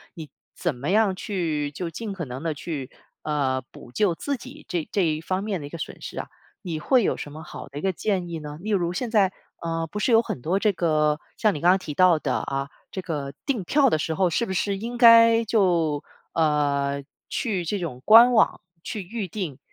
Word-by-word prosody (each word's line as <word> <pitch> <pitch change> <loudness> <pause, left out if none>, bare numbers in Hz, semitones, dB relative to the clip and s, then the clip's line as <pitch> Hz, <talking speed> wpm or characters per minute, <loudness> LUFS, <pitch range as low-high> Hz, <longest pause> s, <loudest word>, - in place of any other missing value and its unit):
你 160 -3 -8 0.3
怎 170 -6 -1
么 135 +6 -4
样 205 -1 +3
去 160 -8 -2
就 170 +3 -4
尽 210 +6 -6
可 175 -4 -5
能 125 0 -7
地 165 -2 -1
去， 145 -3 -5 0.3
呃， 135 -4 0
补 120 - -13
救 180 - +1
自 280 +9 -3
己 270 +5 -12
这 170 -3 -2
这 195 -3 +2
一 155 -1 0
方 185 +3 -2
面 200 -6 -2
的 145 - -6
一 - - -11
个 170 - -7
损 - - -7
失 - - -6
啊？ - - -5 0.4
你 165 -4 -3
会 250 - +3
有 - - +1
什 145 - -7
么 155 +2 -9
好 - - -9
的 140 - -9
一 - - -7
个 190 -1 0
建 185 -1 -1
议 165 -1 -4
呢？ 150 -1 -8
例 215 - -4
如 175 -4 +1
现 230 +4 -3
在 200 -4 +4 0.3
呃， 165 -1 -2
不 210 - -5
是 240 - +1
有 225 - +6
很 145 - -5
多 170 +8 0
这 210 0 +2
个 155 -3 +1 0.2
像 215 -2 +3
你 145 - -5
刚 175 - +6
才 190 - +4
提 160 -5 -6
到 180 +1 +5
的 - - -1
啊， 135 +1 -3 0.2
这 190 - -4
个 145 -5 -4
订 260 -8 -1
票 270 - +3
的 155 - +1
时 160 - -1
候 185 0 +2
是 205 +8 0
不 - - -4
是 200 +2 0
应 235 +4 -5
该 230 -1 +7
就 170 -9 +2 0.3
呃， 140 -3 +1 0.3
去 200 -7 -1
这 205 +5 -1
种 150 -8 -5
官 235 +3 +8
网 220 - +3 0.2
去 210 - -4
预 205 +2 -4
定， 170 -8 -5
175 Hz, 245 characters per minute, -25 LUFS, 150-210 Hz, 0.4 s, 官